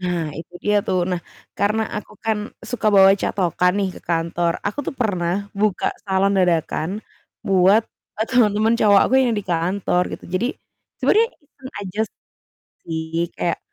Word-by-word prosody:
Nah 175 -4 -2
itu 170 - -9
dia 210 0 +3
tuh, 185 - +1
nah 180 -1 -1 0.4
karena 215 +2 +2
aku 210 - -7
kan 220 -1 +1 0.3
suka 230 -3 -2
bawa 195 -1 +8
catokan 180 -1 +1
nih 195 -1 +1
ke - - -11
kantor. 170 0 0
Aku 205 - -3
tuh - - -3
pernah 180 -7 0 0.3
buka 210 -3 +1 0.2
salon 195 0 +2
dadakan 165 -2 +1 0.6
buat, 195 +3 +5 0.3
eee, 220 - -1
teman-teman 220 -2 +3
cowok 205 -2 +6
aku - - -2
yang 245 -3 +2
di 205 - -5
kantor 180 +2 +1
gitu. - - -8
Jadi 215 +6 +1 0.5
sebenernya 450 +2 +3 0.2
iseng 265 -2 -13
aja 200 +1 -5 0.8
sih 160 -1 -4 0.3
kayak 170 - -1
195 Hz, 155 wpm, -21 LUFS, 175-215 Hz, 0.8 s, bawa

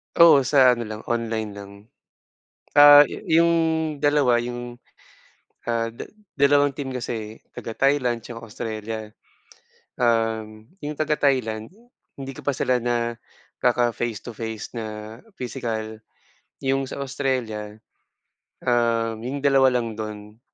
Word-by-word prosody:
Oo, 170 -4 +8
sa 130 -3 +6
ano 120 -2 -2
lang, 110 0 -6
online 115 -2 -2
lang. 100 0 -10 1.1
Ah, 145 0 +10
yu - - -7 0.2
yung 170 - +3 0.5
dalawa, 145 -5 +3
yung, 120 0 -6 0.9
ah, 115 -1 0
da - - -8 0.3
dalawang 145 0 +3
team 140 -2 -5
kasi 125 -2 -4
eh. 110 -1 -5 0.2
Taga 115 - -6
Thailand 135 -4 +2
tsaka 115 -1 -9
Australia. 110 -1 -6 0.8
Um, 110 -2 0 0.2
yung 150 0 -5
taga 155 0 +1
Thailand, 115 -6 0 0.5
hindi 135 0 -6
ko - - -10
pa - - +1
sila 125 -1 0
nakaka 120 0 -1
face 115 -3 -3
to 120 - -8
face 110 0 -6
na 110 0 -6 0.2
pisikal. 110 -3 -4 0.7
Yung 135 0 0
sa - - -7
Australia, 125 -6 -3 0.9
um, 115 -2 +1
yung 135 +5 -5
2 135 -1 +5
lang 115 -2 -4
dun, 105 0 -7
120 Hz, 125 wpm, -23 LUFS, 110-135 Hz, 1.1 s, Ah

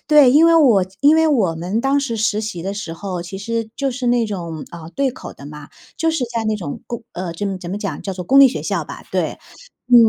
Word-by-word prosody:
对， 295 -4 +7
因 310 +3 +6
为 335 0 +6
我 240 - +5
这 185 - -19
因 290 +2 +6
为 320 0 +4
我 215 - +2
们 180 +7 -2
当 275 +2 +2
时 250 -5 -2
实 215 -1 +1
习 210 -6 -5
的 195 +2 -3
时 200 -5 -5
候， 180 0 -5
其 185 +2 -7
实 225 +2 -3
就 275 -2 -1
是 245 0 -2
那 240 -1 +2
种， 170 -7 -5
呃， 165 -1 -9
对 275 -1 +2
口 - - -9
的 140 - -12
嘛。 150 -1 -10 0.3
就 325 0 +1
是 305 -6 -1
在 230 - 0
那 215 0 0
种 170 -8 -6
公 235 -1 -5
呃， 175 -1 -4
怎 200 +5 -4
么 195 -1 -2
怎 175 0 -7
么 200 - -3
讲， 200 -2 -4
叫 195 - -4
做 180 -1 -6
公 270 +8 +6
立 275 - +9
学 - - -4
校 - - -2
吧， - - -10
对。 - - -1 0.5
嗯， 245 - +3
215 Hz, 285 characters per minute, -19 LUFS, 180-265 Hz, 0.5 s, 立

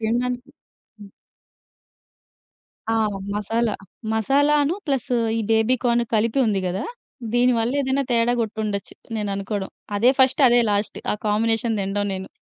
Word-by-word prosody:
తిండానికి. 245 +3 -1 0.5
హ్మ్. 200 -1 -11 1.8
ఆ! - - +2 0.4
మసాలా. 225 +2 0 0.4
మసాలా 275 +7 +3
అనూ 295 +5 +1
ప్లస్ 270 -4 -1 0.3
ఈ - - 0
బేబీ 225 +3 +3
కార్న్ 235 -1 +3
కలిపి 225 +4 +1
ఉంది 200 -3 +1
గదా! 185 +4 -2 0.5
దీని 245 +1 +4
వల్ల 230 +2 0
ఏదన్నా 275 0 0
తేడా 235 0 +3
గొట్టుండచ్చు, 215 -2 -3 0.2
నేననుకోడం. 200 -1 -3 0.3
అదే 235 +5 +5
ఫస్ట్, 265 +2 +4
అదే 240 0 +5
లాస్ట్. 205 0 -1
ఆ - - 0
కాంబినేషన్ 225 +1 +1
తిండం 205 +1 -1
నేను. 190 0 -6
225 Hz, 130 wpm, -23 LUFS, 205-245 Hz, 1.8 s, అదే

